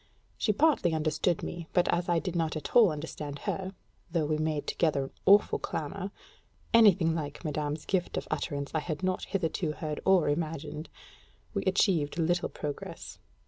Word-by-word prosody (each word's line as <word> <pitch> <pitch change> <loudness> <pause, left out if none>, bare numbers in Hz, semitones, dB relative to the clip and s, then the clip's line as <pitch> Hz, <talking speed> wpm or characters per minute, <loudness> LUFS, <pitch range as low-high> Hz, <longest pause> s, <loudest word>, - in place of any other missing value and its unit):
She 215 - +1
partly 210 - +3
understood 155 +2 0
me, 170 -2 -5
but 180 -1 +3
as 175 +1 0
I 175 - +3
did 180 +1 -2
not 165 -2 0
at 155 - -6
all 225 -7 +7
understand 150 -1 -5
her 190 0 -3 0.3
though 165 -2 0
we 155 0 0
made 155 -1 -1
together 150 -4 +1
an 135 - -7 0.2
awful 200 +2 +6
clamor 160 +5 -4 0.6
(anything 195 -8 +6
like 150 0 -5
madame's 150 0 -2
gift 185 -2 -1
of - - -3
utterance 140 -3 -2
I 160 - +2
had 155 +2 -4
not 185 0 0
hitherto 165 -4 -1
heard 150 -1 -4
or 190 -5 +4
imagined) 155 0 -3 0.6
we - - 0
achieved 180 -6 +2
little 175 +1 +1
progress. 145 -2 -6
165 Hz, 165 wpm, -29 LUFS, 150-180 Hz, 0.6 s, all